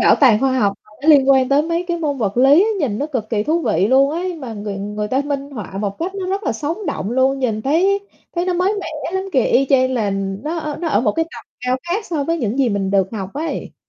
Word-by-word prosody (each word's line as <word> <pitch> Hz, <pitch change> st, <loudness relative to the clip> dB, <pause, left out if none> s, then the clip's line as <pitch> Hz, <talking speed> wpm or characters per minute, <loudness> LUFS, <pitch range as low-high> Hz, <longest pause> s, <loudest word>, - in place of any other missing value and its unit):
bảo -, -, +6 dB
tàng 230 Hz, -6 st, +6 dB
khoa 270 Hz, -1 st, +2 dB
học 200 Hz, -4 st, +2 dB
mà -, -, -22 dB
nó 310 Hz, -, -1 dB
liên 275 Hz, -3 st, +6 dB
quan 265 Hz, -1 st, +4 dB
tới 280 Hz, +2 st, +4 dB
mấy 335 Hz, +2 st, -1 dB
cái 345 Hz, -, 0 dB
môn 290 Hz, -4 st, -2 dB
vật 205 Hz, -3 st, -1 dB
lý, 285 Hz, -, +6 dB
nhìn 220 Hz, -8 st, -1 dB
nó 290 Hz, -, -1 dB
cực 245 Hz, -7 st, -4 dB
kỳ 210 Hz, -2 st, +1 dB
thú 315 Hz, +8 st, +1 dB
vị 180 Hz, +4 st, +2 dB
luôn 270 Hz, +4 st, +4 dB
ấy, 355 Hz, +3 st, -3 dB
mà 260 Hz, -8 st, -7 dB
người 205 Hz, -1 st, -5 dB
người 210 Hz, +1 st, -4 dB
ta 260 Hz, +4 st, +1 dB
minh 280 Hz, -1 st, -3 dB
họa 210 Hz, -7 st, -7 dB
một 200 Hz, -1 st, -3 dB
cách 365 Hz, +4 st, -3 dB
nó 385 Hz, -2 st, -4 dB
rất 390 Hz, +3 st, -2 dB
là -, -, 0 dB
sống 330 Hz, +7 st, -4 dB
động 200 Hz, -, -3 dB
luôn, 260 Hz, +2 st, +2 dB
nhìn 220 Hz, -5 st, -1 dB
thấy 370 Hz, +8 st, +2 dB, 0.3 s
thấy 345 Hz, -, 0 dB
nó 365 Hz, -, 0 dB
mới 370 Hz, +4 st, +1 dB
mẻ -, -, -6 dB, 0.3 s
lắm 380 Hz, 0 st, -1 dB
kìa, 260 Hz, -5 st, +3 dB
y 270 Hz, +2 st, +3 dB
chang 260 Hz, -1 st, +3 dB
là 215 Hz, -5 st, 0 dB, 0.3 s
nó 320 Hz, +3 st, -3 dB
ở 300 Hz, -2 st, -4 dB
nó 335 Hz, -, -1 dB
ở 205 Hz, -, +2 dB
một 245 Hz, -, +1 dB
cái 325 Hz, 0 st, 0 dB
tầm 325 Hz, -, -12 dB, 0.2 s
cao 250 Hz, 0 st, 0 dB
khác 415 Hz, +5 st, -1 dB
so 305 Hz, -5 st, -2 dB
với 330 Hz, +2 st, -1 dB
những 235 Hz, 0 st, -2 dB
gì 265 Hz, -3 st, +3 dB
mình 200 Hz, -3 st, -1 dB
được 195 Hz, -1 st, +2 dB
học 195 Hz, -3 st, -5 dB
ấy. 315 Hz, +3 st, -4 dB
270 Hz, 275 wpm, -19 LUFS, 220-330 Hz, 0.3 s, bảo